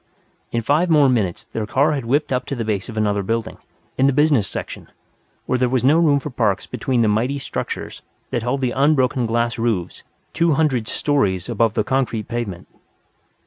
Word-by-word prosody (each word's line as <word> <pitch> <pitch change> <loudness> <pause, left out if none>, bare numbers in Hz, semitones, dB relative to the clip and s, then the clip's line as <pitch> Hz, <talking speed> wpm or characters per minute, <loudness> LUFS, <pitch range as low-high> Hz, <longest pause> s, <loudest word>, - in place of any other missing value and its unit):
In 115 -1 -1
five 155 +8 +2
more 150 -3 +5
minutes 110 -9 0
their 110 -2 -5
car 140 +6 +2
had 140 -5 -2
whipped 140 +3 +1
up 125 0 -2
to 140 - -3
the 115 -3 -3
base 105 -1 -2
of 110 - -7
another 105 -1 +1
building, 115 +3 -3 0.4
in 135 - +5
the 140 - +3
business 145 -7 +3
section, - - -7 0.6
where 130 - 0
there 125 -1 +2
was 130 -1 0
no 150 +5 +5
room 150 -4 +4
for 145 +2 -7
parks 105 -6 0
between 125 -3 -1
the - - +3
mighty 115 +7 +1
structures 135 - -5 0.3
that 120 - -1
held 125 +4 -1
the 125 -2 0
unbroken 130 -3 +2
glass 120 +1 0
roofs 110 -7 -2 0.3
two 170 -1 +2
hundred 135 -7 +1
stories 100 - 0
above 115 -1 +1
the 110 - +2
concrete 125 -4 -1
pavement. 115 -7 -5
125 Hz, 190 wpm, -21 LUFS, 110-140 Hz, 0.6 s, more